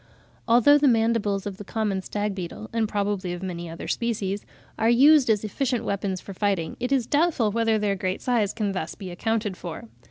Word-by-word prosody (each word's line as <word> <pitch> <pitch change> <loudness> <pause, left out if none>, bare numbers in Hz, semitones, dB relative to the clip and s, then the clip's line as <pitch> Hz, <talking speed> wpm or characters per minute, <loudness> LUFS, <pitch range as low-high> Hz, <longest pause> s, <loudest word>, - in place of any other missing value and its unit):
Although 245 +5 +6
the 290 - +4
mandibles 225 -4 +2
of 200 -2 -5
the 205 - -8
common 205 -2 -2
stag 205 +1 -2
beetle, 190 +3 -7
and 225 -2 0
probably 200 -3 -1
of 175 +1 -7
many 175 -2 -5
other 165 - -7
species, 205 -4 -2 0.3
are 225 - +3
used 270 +2 +6
as 215 -2 +2
efficient 245 +3 -1
weapons 195 -1 -2
for 195 - -9
fighting, 190 -5 -1
it 245 +2 -2
is 265 -4 +2
doubtful 290 -6 +2
whether 225 0 +2
their 205 -2 0
great 185 0 -2
size 230 -5 +1
can 210 -3 -2
thus 175 -4 -4
be 190 -3 -8
accounted 215 +2 -1
for. 165 -10 -8
210 Hz, 195 wpm, -25 LUFS, 190-230 Hz, 0.3 s, Although